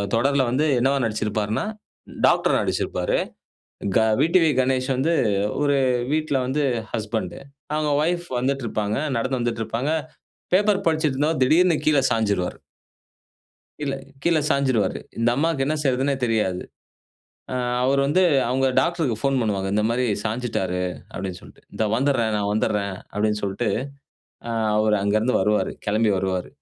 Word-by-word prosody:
தொடர்ல 140 +4 +2
வந்து 135 +6 +1
என்னவா 135 +3 +2
நடிச்சிருப்பார்னா, 110 - -1 0.6
டாக்டரா - - +3
நடிச்சிருப்பாரு. - - -1 0.8
க - - +5 0.2
விடிவி 165 0 +4
கணேஷ் 130 +1 0
வந்து 155 +6 +1 0.5
ஒரு 145 -1 +2 0.3
வீட்ல 155 -1 0
வந்து 140 +4 0 0.3
ஹஸ்பண்ட். 110 +2 -3 0.4
அவங்க 150 -1 0
வைப் 175 +2 0
வந்துட்டு 135 0 -1
இருப்பாங்க. 105 -1 -1 0.2
நடந்து 130 +2 -1
வந்துட்டு 120 -1 -1
இருப்பாங்க. 120 +7 -2 0.6
பேப்பர் 200 0 +3
படிச்சிட்டு 155 -3 +1
இருந்தவ 150 +3 +2
திடீர்னு 165 +5 +4
கீழ 155 -2 +4
சாய்ஞ்டுவாரு. 100 -5 0 1.2
கீழ, 145 -2 -2 0.3
கீழ 170 -1 +3
சாய்ஞ்சிருவாரு. 130 -8 +1 0.2
இந்த 115 +1 +2
அம்மாக்கு 155 -1 +1
என்ன 155 - 0
செய்றதுன்னே 135 0 +1
தெரியாது. 105 -6 0 0.9
ஆ - - -2 0.3
அவர் 135 +2 +3
வந்து 150 +7 +3 0.3
அவங்க 135 +2 +1
டாக்டர்க்கு 160 -3 +1
போன் 135 -1 +2
பண்ணுவாங்க. 100 -4 -1
இந்த 105 - +2
மாரி 125 +2 0 0.2
சாய்ஞ்சிட்டாரு, 105 -5 -2 0.3
அப்படினு 95 -1 -5
சொல்ட்டு. - - -16
இந்த 110 - -1
வந்துட்றேன், 120 -3 +1
நான் 100 0 -1
வந்துட்றேன் 105 -2 0 0.2
அப்படினு 105 +1 0
சொல்ட்டு 100 +3 -1 1.1
அவரு 105 0 +3
அங்க 100 +1 +1
இருந்து 120 +4 0
வருவாரு. 105 +2 +1 0.2
கெளம்பி 105 +1 +2
வருவாரு. 95 -1 -2
125 Hz, 135 wpm, -23 LUFS, 105-145 Hz, 1.2 s, க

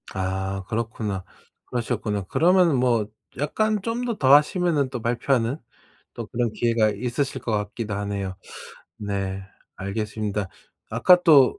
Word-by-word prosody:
아 95 0 -2
그렇구나. 110 -4 -3 0.4
그러셨구나. 115 -4 -2
그러면은 170 - +4
뭐 120 -4 +2 0.3
약간 210 - 0
좀 230 +4 -2
더, 235 -2 -1
더 135 0 +5
하시면은 150 -2 +4
또 125 -3 -5
발표하는 120 +2 +1 0.6
또 - - -5
그런 120 -1 -1
기회가 115 -2 +2
있으실 125 +6 -2
것 115 - -3
같기도 105 +1 -2
하네요. 100 -2 -3 0.6
네 100 -2 -3 0.3
알겠습니다. 105 0 -3 0.4
아까 180 -1 +5
또 145 -7 +6
115 Hz, 280 characters per minute, -24 LUFS, 100-140 Hz, 0.6 s, 또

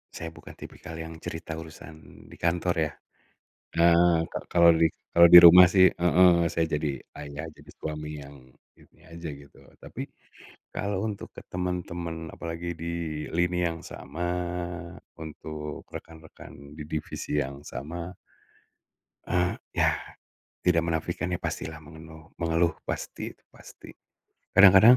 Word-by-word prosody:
Saya 80 0 -6
bukan - - -13
tipikal 80 - -10
yang 80 0 -7
cerita 80 0 -6
urusan 80 0 -11
di - - -13
kantor, 85 +1 +1
ya. 75 - -5 0.8
Eee, 85 0 +5
ka - - -3
kalau 85 -1 +6
di 80 0 +4 0.2
kalau 85 0 +7
di 85 - +15
rumah 90 +2 +11
sih 95 -1 +8
heeh, 90 +1 +5 0.2
saya 85 -1 +1
jadi 75 -3 -3 0.2
ayah, 70 +1 -7
jadi - - -15
suami 75 -1 -5
yang, 70 +1 -12 0.4
ini 80 - -23
aja 85 +1 -9
gitu. 70 0 -16 0.2
Tapi, - - -7 0.7
kalau 100 -1 -2
untuk 105 -2 -5
ke - - -10
temen-temen, 85 -2 -4
apalagi 85 +1 -5
di - - -4 0.5
lini 90 0 +1
yang 80 0 -7
sama, 75 +6 -9 1.0
untuk 75 -1 -7
rekan-rekan 80 -3 -11
di 75 - -6
divisi 75 -1 -4
yang 70 0 -6
sama 85 +7 -7 1.1
eee, 90 0 +1 0.2
ya, - - +3 0.7
tidak 85 -2 +3
menafikan 85 +2 -2
ya 90 - -2
pastilah 80 -2 -4
mengenuh 80 0 -13
mengeluh, 85 0 +1
pasti, - - -5
itu - - -37
pasti. - - -14 0.6
Kadang-kadang 100 +5 +9
80 Hz, 130 wpm, -27 LUFS, 80-85 Hz, 1.1 s, di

